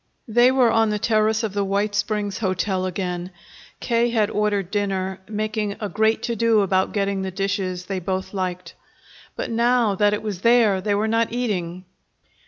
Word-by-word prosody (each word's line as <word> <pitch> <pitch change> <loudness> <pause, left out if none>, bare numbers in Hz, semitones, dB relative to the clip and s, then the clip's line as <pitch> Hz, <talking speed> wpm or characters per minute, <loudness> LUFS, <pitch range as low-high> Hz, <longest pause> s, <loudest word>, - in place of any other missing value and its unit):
They 240 +2 +5
were 255 -3 +3
on 225 -1 +3
the 210 - 0
terrace 215 +1 +1
of 215 -3 -2
the 200 -1 0
White 200 +2 0
Springs 205 -1 -1
Hotel 185 -2 -1
again. 180 -1 -4 0.5
K. 235 0 +1
had 220 -3 +1
ordered 205 -3 0
dinner, 190 -2 -2
making 215 -1 -2
a 210 - -3
great 220 +2 +1
to 235 - -1
do 225 -1 +3
about 190 -1 +1
getting 200 -1 -1
the 190 - -3
dishes 185 -1 -2
they 190 0 -3
both 190 +2 -3
liked. 180 -3 -4 0.6
But - - -4
now 235 -1 +2
that 205 +1 +2
it 210 - -7
was 205 -4 -4
there, 230 -5 +4
they 205 +1 0
were 210 +2 0
not 225 0 +1
eating. 185 -7 -3
205 Hz, 180 wpm, -22 LUFS, 190-220 Hz, 0.6 s, They